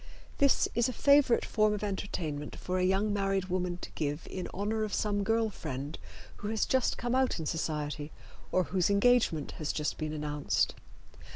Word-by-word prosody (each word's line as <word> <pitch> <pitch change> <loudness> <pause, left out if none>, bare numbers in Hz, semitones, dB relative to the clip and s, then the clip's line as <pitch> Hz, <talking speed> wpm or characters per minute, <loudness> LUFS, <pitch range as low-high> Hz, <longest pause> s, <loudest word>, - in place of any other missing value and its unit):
This 280 -1 +4
is 235 +1 +2
a - - -3
favorite 280 -3 +4
form 215 -1 +2
of 210 - -5
entertainment 165 -7 -3
for 185 0 -2
a - - +1
young 195 +3 +2
married 195 -2 0
woman 180 -1 -1
to - - -6
give 150 +1 -3
in 185 - -4
honor 215 +3 -1
of 215 - -2
some 205 -1 0
girl 225 +1 +1
friend 145 -4 -5 0.4
who 205 - -5
has 220 0 +1
just 260 -2 +1
come 240 +1 -2
out 260 0 +2
in 160 - -4
society 150 -1 -2 0.4
or 185 - +3
whose 180 +1 +1
engagement 200 -7 +3
has 150 - 0
just 150 -1 -2
been 155 -1 -2
announced. 150 -1 0
190 Hz, 180 wpm, -31 LUFS, 155-215 Hz, 0.4 s, This